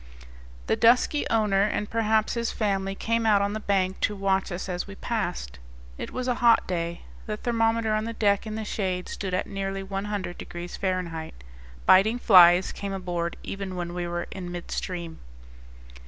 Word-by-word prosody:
The - - +2
dusky 250 +5 +3
owner, 210 -3 +2
and 205 0 0
perhaps 220 -1 +1
his 235 -1 -1
family, 195 -2 -1
came 230 +3 0
out 215 -2 +4
on 200 +1 0
the 215 - -3
bank 190 -3 0
to 210 - 0
watch 195 -1 0
us 175 +2 -4
as 180 0 -3
we 195 - -9
passed. 175 - -3 0.4
It - - -6
was 255 0 -4
a 250 - +2
hot 235 -1 +5
day 170 -1 -3 0.2
the 215 -1 -3
thermometer 225 -1 +1
on 215 0 0
the 230 - -4
deck 205 -1 +1
in 215 - -4
the 220 0 -4
shade 185 -4 -2
stood 190 -2 -3
at 185 - -1
nearly 195 0 -4
100 195 -1 -4
degrees 175 0 -7
Fahrenheit. 170 - -3 0.4
Biting 215 +5 +5
flies 180 -5 +7
came 200 -1 -5
aboard 175 -3 -3
even 195 -1 -5
when 175 -1 -4
we 175 -1 -3
were 175 0 -3
in 180 -2 -6
midstream. 175 -1 -5
195 Hz, 175 wpm, -26 LUFS, 180-215 Hz, 0.4 s, flies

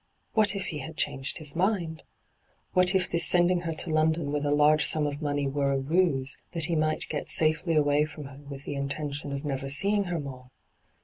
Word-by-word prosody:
What 210 -2 +4
if 195 -1 -3
he 150 - -5
had 155 +3 -8
changed 135 +1 -2
his 150 -2 -7
mind? 175 -3 -1 0.7
What 180 +1 +4
if 185 -2 +2
this 170 -2 -1
sending 175 0 +4
her 170 -1 -3
to 165 - -1
London 155 -1 +1
with 150 0 -1
a - - +1
large 150 +1 +4
sum 155 -1 +1
of 145 +1 -4
money 145 -1 -1
were 140 0 0
a 135 - +1
ruse, 140 -2 +1
that 165 -2 +1
he 170 0 -1
might 155 0 0
get 150 - -4
safely 155 +1 +2
away 145 0 +3
from 155 -1 -9
her 135 0 -11
with 140 -1 -9
the - - -5
intention 140 +1 -3
of 140 +2 -5
never 135 -1 -3
seeing 200 +8 +3
her 175 -2 -2
more. 130 -3 -8
155 Hz, 210 wpm, -27 LUFS, 140-170 Hz, 0.7 s, What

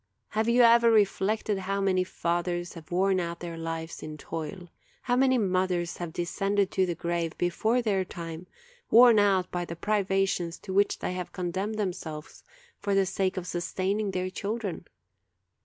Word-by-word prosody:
Have 220 +2 0
you 240 +1 +5
ever 235 0 +6
reflected 210 -1 +2
how 195 +1 -2
many 190 -2 +2
fathers 175 0 -2
have 165 -3 -12
worn 190 +1 +2
out 170 -1 -3
their 170 -1 -6
lives 165 0 -5
in 155 0 -7
toil? 165 +4 -6 0.4
how 245 - +1
many 260 0 +4
mothers 185 -4 0
have 175 -2 -5
descended 195 +3 0
to 190 -1 +1
the 175 - -2
grave 170 -1 -2
before 220 +8 +1
their 200 -4 +1
time, 170 -1 -8 0.4
worn 235 -2 +8
out 195 -3 +2
by 175 0 -2
the 170 -1 -6
privations 195 -3 0
to 190 - -6
which 200 +1 +3
they - - -3
have 180 -1 -5
condemned 190 +4 -2
themselves 165 -6 -5 0.4
for 200 -1 0
the 195 -1 +4
sake 190 0 -1
of 180 - -3
sustaining 190 +4 -1
their 185 -1 -2
children? 205 -2 -4
185 Hz, 165 wpm, -28 LUFS, 175-205 Hz, 0.4 s, worn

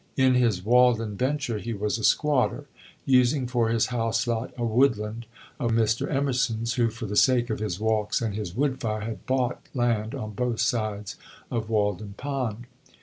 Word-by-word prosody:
In 130 -1 +4
his 115 -7 +1
Walden 120 -3 +3
venture 130 -2 -1
he 115 +2 -4
was 105 +2 -1
a - - -6
squatter, 145 +2 +2 0.4
using 130 +1 +3
for 120 -2 +1
his 115 -1 +2
house 115 0 0
lot 115 0 -2
a 120 - -2
woodland 115 -2 +1 0.3
of 120 -5 0
Mr. 110 0 +1
Emerson's, 125 -5 0
who, 120 -2 +2
for 115 +1 -7
the 105 0 -4
sake 120 0 +3
of 110 - -2
his 105 -4 -3
walks 110 -1 +1
and 115 -3 -2
his 100 -4 -5
wood 130 0 0
fire, 110 -3 -2
had 110 +1 -6
bought 130 -2 0
land 120 -1 0
on 110 -6 -5
both 120 +1 -2
sides 105 -3 -1 0.3
of 115 -2 -2
Walden 105 -2 -1
Pond. 125 -5 -3
115 Hz, 175 wpm, -26 LUFS, 110-125 Hz, 0.4 s, In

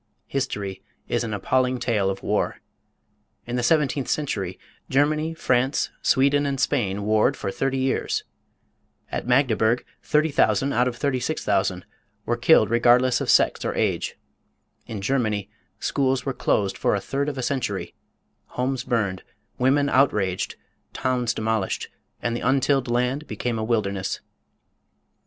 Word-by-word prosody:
History 100 -8 -3 0.3
is - - 0
an 115 - -4
appalling 125 +5 +1
tale 105 -6 +1
of 95 0 -4
war. - - 0 0.9
In 120 - -4
the 125 - 0
seventeenth 140 0 +2
century 100 -11 -2 0.3
Germany, 155 +4 +1
France, 130 -2 +1
Sweden, 140 +2 +3
and 135 -1 -2
Spain 100 -6 0
warred 110 +6 +2
for 100 - -3
thirty 135 +5 -1
years. 130 0 0 0.9
At - - -3
Magdeburg 125 -2 +2 0.2
30,000 150 -2 +2
out 125 +1 +3
of 125 - -2
36,000 120 -9 -1 0.4
were - - +1
killed - - +4
regardless 120 +2 +4
of - - -2
sex - - +4
or - - -2
age. - - 0 0.7
In 105 -3 -5
Germany 110 -3 -1 0.3
schools 135 -2 0
were 135 - -1
closed 100 -5 0
for - - +2
a - - 0
third 140 +1 -2
of 140 - -6
a 130 - -2
century, 120 -6 -2 0.6
homes 130 0 -1
burned, 105 -8 -1 0.4
women 140 +3 +3
outraged, 105 -10 +1 0.4
towns 125 -3 0
demolished, 110 -3 -1 0.3
and 120 0 0
the - - -3
untilled 135 0 +2
land 125 +5 0
became 115 +2 -2
a - - -2
wilderness. 100 -4 -1
125 Hz, 135 wpm, -24 LUFS, 110-135 Hz, 0.9 s, killed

